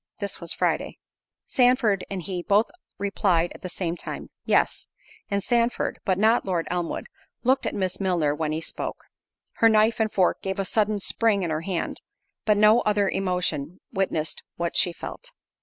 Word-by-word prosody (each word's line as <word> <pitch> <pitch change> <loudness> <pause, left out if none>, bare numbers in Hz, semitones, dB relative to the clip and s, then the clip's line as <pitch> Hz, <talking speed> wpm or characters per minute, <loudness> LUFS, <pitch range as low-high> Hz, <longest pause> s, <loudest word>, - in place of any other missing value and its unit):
This 200 -3 -4
was 170 - -4
Friday. - - -1 0.5
Sandford 245 -6 +3
and 190 -3 -4
he 180 +1 -3
both 205 +5 +2 0.3
replied 190 -4 +1
at - - -13
the 185 - -5
same 175 -1 -2
time, - - -7
"Yes." - - +2 0.4
And 200 -1 0
Sandford, 240 -1 +1
but 185 -3 +2
not 220 +4 +4
Lord 175 -4 -1
Elmwood, 175 -2 -2 0.4
looked 260 +2 +2
at - - -3
Miss 185 -2 -1
Milner 175 -7 +1
when 155 0 -2
he 155 +1 -2
spoke. - - -4 0.5
Her 225 - +6
knife 220 +1 +3
and 220 -1 +1
fork 185 -2 +2
gave 190 0 -3
a 195 - -1
sudden 210 +1 +1
spring 200 +1 +1
in 170 - -1
her 155 0 -1
hand, 175 -1 -3 0.4
but 210 -1 +4
no 215 +2 +6
other 205 -1 +2
emotion 180 -4 -1
witnessed 165 -5 -1
what 170 0 -2
she 175 - +4
felt. - - -8
195 Hz, 175 wpm, -25 LUFS, 175-215 Hz, 0.5 s, Her